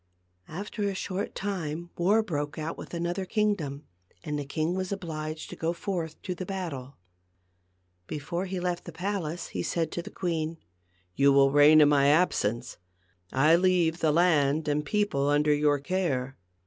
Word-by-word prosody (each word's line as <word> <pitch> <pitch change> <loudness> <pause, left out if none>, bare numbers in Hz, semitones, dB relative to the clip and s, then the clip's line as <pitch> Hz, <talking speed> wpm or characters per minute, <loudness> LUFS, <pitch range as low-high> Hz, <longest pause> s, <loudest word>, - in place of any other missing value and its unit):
After 200 +6 -6
a 195 - -4
short 190 +1 -4
time 175 -4 -4
war 205 +6 +3
broke 145 -7 -3
out 155 +1 -3
with - - -8
another 175 +2 -2
kingdom, 185 -9 -1 0.4
and 150 -3 -3
the 145 - -4
king 155 +4 -1
was 185 0 -3
obliged 155 -5 -5
to - - -6
go 165 +1 -1
forth 170 -4 -4
to 185 - -3
the 180 - -6
battle. 165 -9 -5 1.1
Before 170 +5 -3
he 185 0 -3
left 175 -1 -2
the 170 - -7
palace 175 -1 -3
he - - -3
said 165 -1 -1
to 175 - -3
the - - -9
queen, 165 -3 -2 0.6
"You 140 0 +5
will 135 0 +5
reign 145 +2 +7
in 145 - +6
my 140 -1 +4
absence. 130 -7 +1 0.5
I 150 +5 +5
leave 175 -2 +2
the 155 - +3
land 155 -3 +3
and 150 0 +1
people 150 -6 0
under 150 +1 +3
your 145 0 +3
care. 140 -5 -1
160 Hz, 165 wpm, -28 LUFS, 145-180 Hz, 1.1 s, reign